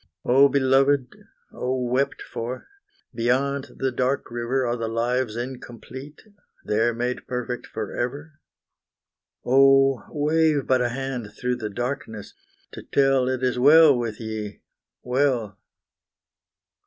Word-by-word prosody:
Oh, 135 +3 +5
beloved 135 -1 +2 0.4
oh, 130 +1 -2
wept 125 +3 -1
for! 120 +3 -6 0.5
beyond 135 +4 -1
the 135 -1 -1
dark 130 +2 -1
river 120 +2 -1
Are 120 0 0
the 115 -2 -3
lives 120 +1 -1
incomplete, 130 +3 -8 0.4
there 110 +3 +1
made 120 +2 -3
perfect 125 0 -4
forever? 140 +8 -5 1.1
Oh, 135 0 +5
wave 155 -1 +1
but 130 -1 +2
a 120 - +1
hand 125 -3 -5
through 125 0 -2
the 110 -3 -4
darkness, 115 -2 -5 0.4
to - - -9
tell 135 -2 +2
It 130 0 -2
is 125 -1 0
well 150 +2 +7
with 115 -3 -3
ye 110 -2 -6 0.4
well. 125 -6 0
125 Hz, 115 wpm, -24 LUFS, 120-135 Hz, 1.1 s, well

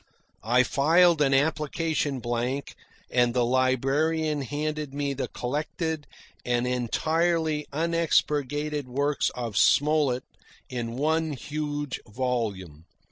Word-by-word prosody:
I 125 +3 +3
filled 165 +5 +4
an 135 -2 +4
application 150 -1 0
blank 120 +4 -2 0.4
and 120 -1 +2
the 125 -1 +3
librarian 140 +5 +1
handed 150 +2 -3
me 140 -1 -1
the 135 - -3
collected 155 +4 -3 0.4
and 120 0 0
entirely 155 +5 0
unexpurgated 150 -3 0
works 140 +3 0
of 120 -4 -4
Smollett 145 -3 +3 0.5
in 120 -2 -4
one 160 +3 0
huge 145 +1 -4
volume. 105 - -3
145 Hz, 100 wpm, -26 LUFS, 125-155 Hz, 0.5 s, filled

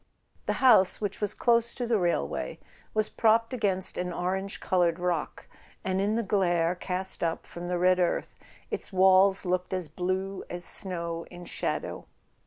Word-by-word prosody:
The - - +2
house, 220 -8 +5
which 205 -1 -4
was 210 0 -1
close 235 -1 +2
to 245 - -3
the 230 -3 +1
railway, 175 -2 -1 0.4
was 215 0 +2
propped 230 +2 +2
against 195 -6 0
an 180 0 -2
orange 190 +3 -3
coloured 175 -3 +1
rock, 175 -3 -3 0.4
and 190 0 0
in 205 +2 +1
the 230 - 0
glare 175 -4 +1
cast 185 +1 -3
up 165 -1 -2
from 175 0 -8
the 180 0 -1
red 185 +1 +3
earth 175 - -1 0.4
its - - -3
walls 190 +1 +4
looked 180 +1 -1
as 180 -3 -3
blue 185 +4 -3
as 175 0 -5
snow 170 -3 +1
in 175 0 -10
shadow. - - -4
185 Hz, 165 wpm, -28 LUFS, 175-200 Hz, 0.4 s, house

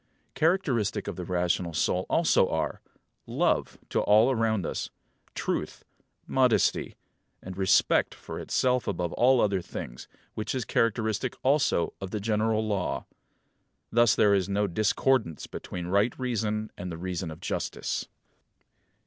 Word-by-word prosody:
Characteristic 150 - +1
of 100 - -4
the 90 - -6
rational 90 -1 -1
soul 90 +3 0
also - - +3
are: - - -2 0.5
Love - - 0
to - - +1
all 110 +5 +5
around 110 -6 +1
us, - - -3 0.5
truth, - - -3 0.4
modesty; 130 -3 +2 0.5
and 95 0 -7
respect 95 +1 +3
for - - -8
itself 125 -1 +1
above 90 -4 -2
all 130 +1 +4
other 100 -4 +2
things, 60 -7 -8 0.3
which 110 +4 -3
is 125 -4 -2
characteristic 115 +1 0
also 135 - +2
of 95 - -4
the 105 - -3
general 110 +1 +1
law. 100 -4 -2 0.9
Thus 120 -2 +4
there 105 -1 +4
is 100 -1 +1
no 100 +1 +1
discordance 105 - +1
between 90 -1 -6
right 100 +6 +1
reason 110 -4 -2
and 90 0 -6
the 80 - -5
reason 90 0 -4
of 80 - -9
justice. - - -3
105 Hz, 135 wpm, -28 LUFS, 90-115 Hz, 0.9 s, all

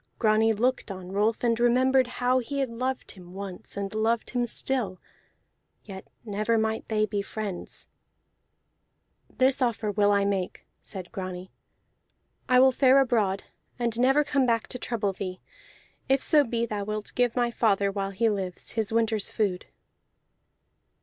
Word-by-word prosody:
Grani 220 0 +3
looked 245 +4 0
on 185 -2 -7
Rolf, 210 +4 0
and 230 -1 +2
remembered 255 +2 +4
how 250 +1 +2
he 280 +3 -5
had 270 -3 -1
loved 255 +3 -3
him 180 -1 -13
once, 195 -1 -8
and 200 0 -3
loved 220 +1 0
him 245 -1 0
still, 230 -7 -1 0.8
yet 190 -2 -10 0.2
never 215 +2 0
might 220 0 -1
they 215 -1 +1
be 205 -1 -2
friends. 200 -2 -6 1.4
"This 260 +1 +1
offer 230 -4 0
will 205 0 +3
I 200 -1 +3
make," 195 -2 -2 0.2
said 190 -3 -7
Grani. 185 -1 -6 1.0
"I 250 0 +6
will 265 +1 +7
fare 265 +1 +5
abroad, 215 -7 +1 0.3
and 235 -2 -1
never 270 +4 +4
come 275 -3 +1
back 230 -2 +1
to 250 - -5
trouble 210 -5 -1
thee, 185 -1 -5 0.7
if 270 0 +3
so 300 -2 +5
be 235 -2 -1
thou 210 -3 -3
wilt 215 +1 -4
give 245 -2 +1
my 240 -1 +1
father, 200 -4 +2
while 195 -1 -2
he 195 +4 0
lives, 190 -4 -3
his 225 -1 -1
winter's 225 -2 +1
food." 195 -4 -1
220 Hz, 155 wpm, -27 LUFS, 200-245 Hz, 1.4 s, will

